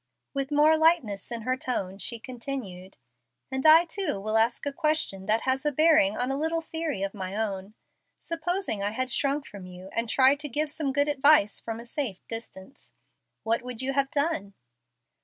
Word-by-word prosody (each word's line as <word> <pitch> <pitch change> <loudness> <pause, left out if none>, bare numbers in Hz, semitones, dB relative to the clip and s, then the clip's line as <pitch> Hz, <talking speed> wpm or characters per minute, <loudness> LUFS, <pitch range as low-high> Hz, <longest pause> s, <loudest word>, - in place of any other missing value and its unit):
With 275 -1 -2
more 300 +2 +4
lightness 295 - +2
in 230 -2 -3
her 255 +2 0
tone 195 -7 -3
she 235 - -2
continued, 230 -7 -7 0.5
"And 265 0 -2
I 325 +2 +8
too 340 - -2
will 215 +2 -3
ask 225 +4 +2
a 285 - -2
question 305 - -1
that 220 +1 +2
has 260 0 0
a 295 - +1
bearing 305 -9 +4
on 250 +2 -1
a 270 - -1
little 325 +2 0
theory 320 -9 -3
of 195 - -3
my 190 -1 -5
own. 205 -1 -3 0.4
Supposing 335 - -2
I 205 +1 -1
had 255 +2 -2
shrunk 275 +3 0
from 195 -3 -10
you, 180 +1 -11
and 230 +2 -1
tried 270 +3 +4
to 295 0 -5
give 295 +4 -1
some 295 -3 -2
good 285 +2 +1
advice 290 -6 +4
from 225 0 -6
a 235 - -10
safe 240 -6 -5
distance, 225 0 -8 0.5
what 230 +1 +1
would 250 0 -5
you 270 +1 -1
have 275 0 +1
done?" 285 - -1
260 Hz, 190 wpm, -27 LUFS, 210-295 Hz, 0.5 s, I